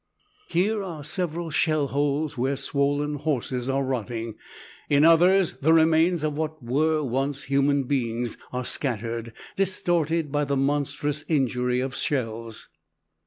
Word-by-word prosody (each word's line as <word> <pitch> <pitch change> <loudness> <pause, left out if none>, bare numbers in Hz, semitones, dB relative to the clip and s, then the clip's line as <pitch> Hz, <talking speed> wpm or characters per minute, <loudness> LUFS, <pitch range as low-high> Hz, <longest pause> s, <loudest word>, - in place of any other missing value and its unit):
Here 205 +5 +1
are 170 -6 -6
several 170 0 -2
shell 155 -2 +1
holes 145 +2 0
where 130 +3 0
swollen 145 +2 0
horses 130 -3 -2
are 135 +1 +1
rotting; 115 -3 -3 0.6
in 145 +1 +5
others 175 +3 +5
the 160 +4 +4
remains 165 +1 +4
of 150 -1 -1
what 155 -2 -4
were 155 +5 +1
once 135 +2 -2
human 140 +1 +2
beings 120 -3 -1 0.2
are 125 0 -3
scattered, 115 -3 -2 0.2
distorted 170 -5 0
by 145 0 +1
the 140 0 0
monstrous 145 +1 -1
injury 125 -4 +1
of 130 0 -3
shells. 115 -4 -3
145 Hz, 130 wpm, -25 LUFS, 130-160 Hz, 0.6 s, in